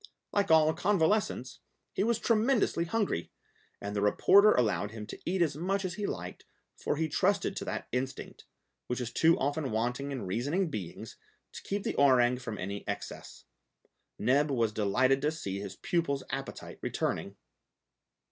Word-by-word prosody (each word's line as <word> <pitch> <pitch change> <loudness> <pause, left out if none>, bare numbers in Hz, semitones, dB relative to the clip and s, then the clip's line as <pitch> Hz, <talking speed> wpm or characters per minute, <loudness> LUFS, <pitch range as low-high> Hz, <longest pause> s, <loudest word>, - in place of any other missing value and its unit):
Like 200 -1 +1
all 160 -1 +5
convalescents, 180 - +1 0.3
he 195 - 0
was 230 +1 +2
tremendously 230 -6 +2
hungry, 195 - -1 0.5
and 100 +1 -5
the 100 - 0
reporter 200 - +6
allowed 105 - +1
him 110 0 -7
to - - -9
eat 180 0 +2
as 150 -4 -1
much 190 +5 -1
as 180 - -2
he 205 +2 -3
liked, - - -6 0.3
for - - -2
he 160 +1 0
trusted 195 +5 +1
to - - -4
that - - -4
instinct, 130 +1 -4 0.4
which 125 - -2
is 125 -1 -4
too 165 +6 +4
often 145 0 -1
wanting 125 +5 -1
in 130 -7 -4
reasoning 145 - -1
beings, 95 - -6 0.3
to - - -9
keep 200 0 -3
the - - -1
orang 125 -3 +4
from 115 -4 -5
any 100 +2 -4
excess. - - -6 0.7
Neb 145 +4 +2
was 115 -5 +1
delighted 125 +6 +2
to 150 +2 +1
see 100 - -4
his 100 -2 -6
pupil's 140 - -1
appetite 135 0 -6
returning. - - -2
140 Hz, 160 wpm, -30 LUFS, 120-180 Hz, 0.7 s, reporter